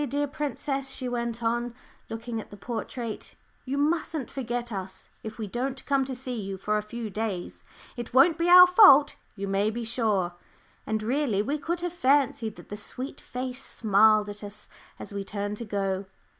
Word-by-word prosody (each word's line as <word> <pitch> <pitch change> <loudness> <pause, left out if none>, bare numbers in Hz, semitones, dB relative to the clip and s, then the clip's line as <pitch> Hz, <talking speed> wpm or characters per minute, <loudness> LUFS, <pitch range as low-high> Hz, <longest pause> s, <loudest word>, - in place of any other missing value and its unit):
"Dear 290 +2 0
princess," 275 -1 -3
she 260 -1 -4
went 235 -1 -3
on, 240 +1 0 0.3
looking 225 0 -4
at - - -14
the 205 - -11
portrait, 230 +1 -5 0.3
"you 275 +2 -2
mustn't 305 -2 0
forget 240 -2 -3
us 190 -2 -6
if 220 0 -7
we 220 - -3
don't 255 +6 -3
come 275 -2 +2
to 260 -1 -4
see 250 -2 -4
you 195 -1 -5
for 210 +3 0
a - - -3
few 220 +1 -6
days. 205 -3 -4 0.3
It 240 -2 -6
won't 305 +6 +5
be 340 +1 +2
our 360 0 +11
fault, 360 -7 +7 0.2
you 200 -1 -4
may 195 +2 +1
be 235 +2 -4
sure;" 215 -6 0 0.5
and 215 0 -1
really 240 -4 +1
we 290 +6 -2
could 340 +3 -2
have 350 -1 -2
fancied 270 -8 +2
that - - -14
the 205 - -5
sweet 255 +6 -5
face 250 +1 -5
smiled 215 0 +4
at 205 0 -7
us 205 +1 -9 0.3
as - - -9
we 200 0 -3
turned 205 +1 -4
to 235 - -5
go. 195 -2 -1
235 Hz, 185 wpm, -27 LUFS, 210-270 Hz, 0.5 s, our